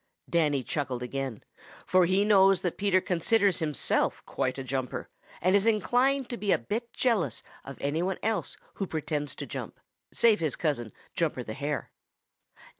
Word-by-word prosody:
Danny 150 -5 +2
chuckled 130 -3 -3
again, 130 -2 -4 0.4
for 185 -1 +4
he 190 +3 +3
knows 195 -2 +5
that 180 - -1
Peter 200 -2 +3
considers 190 +2 +2
himself 150 -4 0
quite 130 0 -2
a 135 - -4
jumper 130 -1 -3 0.3
and 185 +4 +3
is 200 +2 +3
inclined 245 +5 +2
to 240 - -5
be 205 -3 0
a - - +5
bit 225 - -4
jealous 205 - 0 0.2
of 140 - -9
any 145 +4 -1
one 190 +1 -1
else 220 0 -1 0.2
who 195 - -2
pretends 150 -2 -3
to - - -5
jump - - -7 0.3
save 225 -2 +4
his 155 -4 -1
cousin, 130 -9 -1 0.2
Jumper 155 -7 -1
the 110 - -6
Hare. 145 +1 -3
170 Hz, 165 wpm, -28 LUFS, 140-205 Hz, 0.4 s, knows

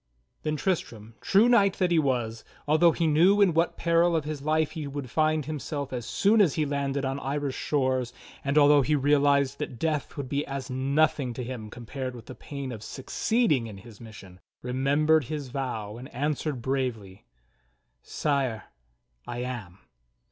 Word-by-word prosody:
Then 155 0 -1
Tristram, 115 - -3
true 205 +5 +4
knight 200 -6 +4
that 180 -2 0
he 170 - +4
was, 120 -6 -1 0.2
although 160 +3 +5
he 165 - -1
knew 170 +7 +4
in 195 -4 +5
what 165 +2 +1
peril 170 0 +3
of 160 - +1
his 150 -2 -4
life 155 +1 +1
he 155 -3 -5
would 140 -3 -6
find 155 -2 +1
himself 145 -2 -4
as 120 -3 -4
soon 210 +2 +3
as 170 -9 +3
he 155 - +1
landed 140 -1 -1
on 135 +1 -2
Irish 140 0 -2
shores, 130 -4 0 0.3
and 140 +2 0
although 145 0 +6
he 150 +3 +1
realized 140 -1 +2
that 145 -5 -5
death 155 +2 -2
would 140 -2 -4
be 140 +2 -1
as 135 -2 -5
noth 140 +5 +2
ing 125 -4 -3
to 125 - -4
him 120 -3 -6
compared 125 +2 -6
with 120 - -11
the - - -9
pain 140 0 -7
of 110 -3 -7
succeeding 145 - 0
in 105 -3 -9
his 110 +2 -14
mission, 100 -5 -12 0.2
remembered 140 +4 +2
his 145 0 -5
vow, 120 -5 -4
and 130 +4 -10
answered 145 -1 -2
bravely: 120 - -3 0.7
"Sire, 135 -7 -1 0.6
I 120 0 -4
am." 115 -8 -6
140 Hz, 175 wpm, -27 LUFS, 125-155 Hz, 0.7 s, although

